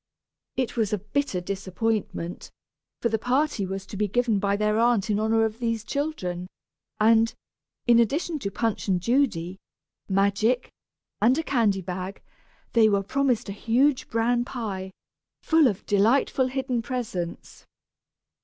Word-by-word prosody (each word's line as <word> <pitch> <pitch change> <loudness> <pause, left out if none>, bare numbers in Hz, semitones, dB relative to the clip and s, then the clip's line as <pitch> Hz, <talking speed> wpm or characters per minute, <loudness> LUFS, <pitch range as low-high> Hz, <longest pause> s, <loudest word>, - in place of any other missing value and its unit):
It 255 -3 -1
was 220 -4 0
a 210 - +1
bitter 210 +1 -2
disappointment, 195 -1 -3 0.5
for 235 - +3
the 220 0 0
party 250 -4 0
was 195 0 -5
to 200 - -9
be 210 +1 0
given 230 0 +1
by 200 0 +1
their 210 +1 +1
aunt 230 -3 +2
in 205 - +1
honor 225 +1 +2
of 220 +1 -4
these 230 -2 -1
children, 210 - -3 0.5
and, 225 +1 +5 0.5
in 235 -1 +6
addition 300 - 0
to 200 - -3
Punch 225 +2 -2
and 185 -2 +2
Judy, 190 -6 0 0.5
magic, 200 +5 +1 0.5
and 245 +6 +4
a 325 - 0
candy 220 -10 +1
bag, 185 +2 -5 0.5
they 225 -2 +5
were 200 -1 +1
promised 255 +1 0
a - - -4
huge 250 +7 +1
bran 235 +2 +1
pie, 205 -7 -5 0.5
full 320 -3 +5
of 205 -6 -2
delightful 235 +5 +3
hidden 260 -2 -1
presents. 225 -9 -5
225 Hz, 145 wpm, -25 LUFS, 200-245 Hz, 0.5 s, in